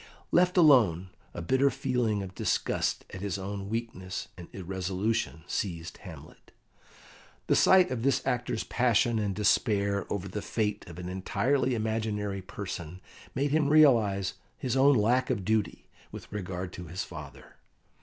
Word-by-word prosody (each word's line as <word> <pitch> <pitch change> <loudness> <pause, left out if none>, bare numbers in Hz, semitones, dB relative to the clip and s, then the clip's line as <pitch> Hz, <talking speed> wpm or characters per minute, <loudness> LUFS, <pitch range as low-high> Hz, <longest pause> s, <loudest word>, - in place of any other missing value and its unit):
Left 180 +1 +3
alone, 110 - +5 0.2
a 85 - -6
bitter 130 +9 +3
feeling 125 -6 -1
of 95 -1 -8
disgust - - -1
at 95 - -7
his 100 -1 -2
own 100 +1 -5
weakness 110 -5 -4
and 90 -2 -10
irresolution 95 - -2
seized 85 -3 -4
Hamlet. - - -12 1.0
The - - +3
sight 185 -1 +5
of 125 -3 -2
this 135 +2 +1
actor's 120 -2 -1
passion 120 -2 +2
and 100 -2 -1
despair 100 -1 +1
over 100 -1 -2
the 105 +2 -5
fate 105 -1 -2
of 85 -1 -10
an 90 0 -6
entirely 125 +8 0
imaginary 110 -3 -2
person 90 -3 -7 0.4
made 140 +2 0
him 150 -1 +2
realise 115 -11 +4 0.2
his 125 -1 -2
own 140 +1 +5
lack 120 +4 +2
of 105 -8 -1
duty 110 -1 -1 0.2
with - - -10
regard 95 -2 -5
to 90 - -7
his 90 +3 -4
father. - - -11
105 Hz, 145 wpm, -29 LUFS, 95-125 Hz, 1.0 s, alone